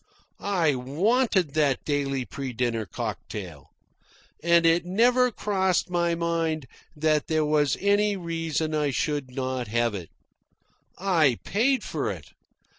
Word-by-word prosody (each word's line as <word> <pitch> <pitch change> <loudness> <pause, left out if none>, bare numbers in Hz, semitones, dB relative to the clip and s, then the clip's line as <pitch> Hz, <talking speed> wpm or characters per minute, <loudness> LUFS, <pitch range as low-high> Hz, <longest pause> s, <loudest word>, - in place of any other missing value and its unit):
I 175 -7 +1
WANTED 180 - +1
that 145 -4 +1
daily 140 -3 -1
pre 135 -1 -6
dinner 115 -3 -1
cocktail. 85 -4 -6 0.7
And 170 0 +4
it 165 +1 +4
never 245 +7 +3
crossed 190 -5 0
my 170 -1 +1
mind 165 -3 -1 0.3
that 155 0 +1
there 155 -1 +1
was 150 -2 +2
any 205 +1 +2
reason 165 -3 -2
I 150 -2 +1
should 145 +1 -1
not 130 -2 -2
have 115 +1 0
it. 90 -5 -6 0.9
I 165 -10 +2
paid 255 +6 +1
for - - -2
it. - - -7
155 Hz, 125 wpm, -26 LUFS, 135-180 Hz, 0.9 s, And